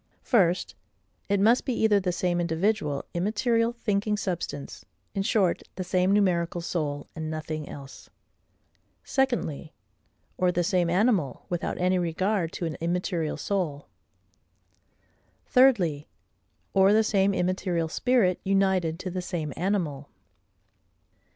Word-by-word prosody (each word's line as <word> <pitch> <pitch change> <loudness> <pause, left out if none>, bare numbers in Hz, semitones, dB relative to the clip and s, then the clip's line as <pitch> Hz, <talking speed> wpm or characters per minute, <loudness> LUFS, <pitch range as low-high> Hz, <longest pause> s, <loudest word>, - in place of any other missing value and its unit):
First, 185 -7 +2 0.6
it 200 0 +2
must 225 +5 +4
be 255 - -2
either 215 -2 +4
the 185 -2 -1
same 175 0 0
individual, 170 -3 0
immaterial, 230 +5 +1
thinking 210 -3 -1
substance; 170 -8 -4 0.3
in 195 - -1
short, 195 -3 +1
the 185 - -3
same 185 +1 +1
numerical 175 -4 +2
soul, 150 -4 -3
and 160 -1 -4
nothing 155 -1 -5
else. 135 -1 -11 0.9
Secondly, 240 - -1 0.7
or 180 -1 +3
the 175 0 0
same 175 0 +1
animal, 185 - +1
without 175 -1 -2
any 180 +1 +2
regard 175 +1 0
to 175 - -3
an 155 -4 -4
immaterial 170 -2 -1
soul. 155 -4 -2 1.6
Thirdly, 190 - +3 0.7
or 195 +1 +5
the 220 +1 +5
same 200 -2 +2
immaterial 180 -2 0
spirit 215 -1 +2
united 190 -4 +1
to 185 - -4
the 185 +1 -3
same 165 -5 -4
animal. 165 -7 -2
180 Hz, 120 wpm, -27 LUFS, 165-200 Hz, 1.6 s, or